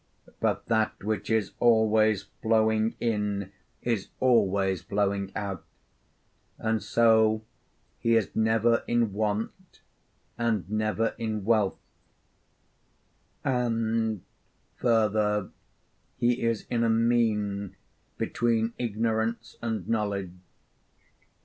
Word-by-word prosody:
But - - 0
that 110 -3 0
which 105 -1 -2
is 110 -3 +1
always 110 -3 +4 0.2
flowing 110 0 +2
in 105 -4 -1 0.3
is 115 -5 -1
always 100 -6 +2
flowing 100 -1 -1
out, 100 -3 -4 0.9
and 110 0 -1
so 110 -1 +3 0.6
he 115 0 +2
is 110 -4 0
never 115 +1 +2
in 120 -4 +1
want 110 - -3 0.6
and 110 -6 0
never 110 +2 0
in 110 -3 -3
wealth; 110 -3 +2 1.7
and, 115 -5 0 0.5
further, 105 -3 +1 0.7
he 120 +1 +1
is 115 -2 0
in 115 -1 +1
a 115 - +2
mean 110 -4 +1 0.4
between 115 -1 0
ignorance 115 +1 -1
and 115 -1 -3
knowledge. 100 -5 -1
110 Hz, 90 wpm, -27 LUFS, 105-115 Hz, 1.7 s, always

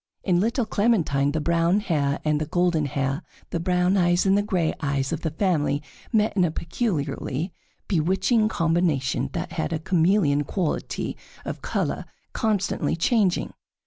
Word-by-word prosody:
In 180 -3 +2
little 235 +5 +1
Clementine 170 -12 +2
the 155 - -1
brown 170 +4 +2
hair 150 -8 0
and 150 0 +1
the 155 - -2
golden 175 -3 +1
hair, 135 +2 -1 0.3
the 170 - -1
brown 180 +2 +2
eyes 175 0 +3
and 195 0 +4
the 205 - +3
gray 180 -6 0
eyes, 140 -1 -1
of 165 - -3
the 160 - -1
family 155 -4 0 0.3
met 215 -3 +2
in 185 - +3
a 175 - +3
peculiarly 160 - -2 0.3
bewitching 195 +6 +2
combination 165 -7 +1
that - - -3
had 75 - -2
a - - 0
chameleon 165 -3 +2
quality 170 +2 -2 0.3
of - - -5
color - - -2 0.3
constantly 210 -5 0
changing. 190 +2 +1
170 Hz, 150 wpm, -24 LUFS, 150-195 Hz, 0.3 s, and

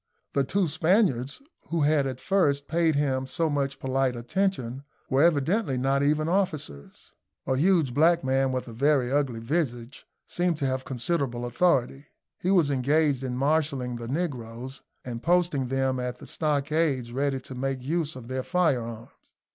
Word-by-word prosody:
The 140 - +2
two 190 +6 0
Spaniards, 160 - +1 0.3
who 165 -1 0
had 145 -1 +3
at 130 -1 -5
first 145 -7 +1
paid 165 -1 +2
him 135 -2 0
so 160 +4 0
much 140 -1 -1
polite 130 -1 0
attention, 130 -1 -2 0.3
were 135 +1 +4
evidently 165 - +2
not 135 +2 +1
even 150 +2 +2
officers. 160 - -3 0.3
A 130 - +1
huge 160 -3 +2
black 165 +4 +4
man, 135 0 +1
with 130 -1 -3
a 115 - -8
very 135 0 +2
ugly 135 -5 0
visage, 120 -2 -3 0.2
seemed 175 -2 0
to 140 - -2
have 130 0 -1
considerable 130 -2 -2
authority. 135 -1 +1 0.3
He 180 - -1
was 175 -7 +4
engaged 140 +1 +2
in 125 -1 -3
marshalling 140 -3 0
the 120 0 -7
negroes, 130 -4 -4 0.2
and 120 -2 -5
posting 170 -5 +1
them 135 0 0
at 125 0 -3
the - - -12
stockades 150 -4 0
ready 135 +1 -1
to 130 - -10
make 130 0 -3
use 160 +2 -1
of 125 -3 -9
their 130 +1 -2
firearms. 125 -9 -1
140 Hz, 160 wpm, -26 LUFS, 130-160 Hz, 0.3 s, were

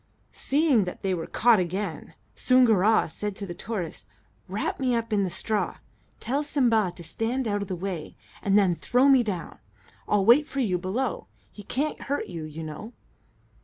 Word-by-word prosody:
Seeing 280 - +2
that 180 - -7
they 190 -1 +1
were 165 -2 -3
caught 235 -3 +4
again, 180 -1 -4 0.2
Soongoora 225 - +4
said 205 +5 -5
to 200 - -5
the 175 - -6
tortoise: 175 - -5 0.4
"Wrap 200 +4 -3
me 255 -2 +1
up 230 -1 -2
in 200 -1 +2
the 190 - -1
straw, 210 +4 -2 0.4
tell 270 +5 -1
Simba 240 - +2
to 170 - -9
stand 230 +8 -2
out 205 -1 -1
of 200 - -4
the 185 - -3
way, 180 -3 -5 0.3
and 200 0 +3
then 195 -4 +4
throw 250 +9 +2
me 270 -2 +6
down. 200 -7 -5 0.5
I'll 205 -2 +2
wait 270 +7 +6
for 275 - -4
you 190 -8 +1
below. 215 +8 -2 0.2
He 210 - -11
can't 275 +9 -2
hurt 285 +1 -2
you, 165 -3 -6
you 155 +1 -7
know." 155 +10 -8
210 Hz, 180 wpm, -26 LUFS, 185-245 Hz, 0.5 s, me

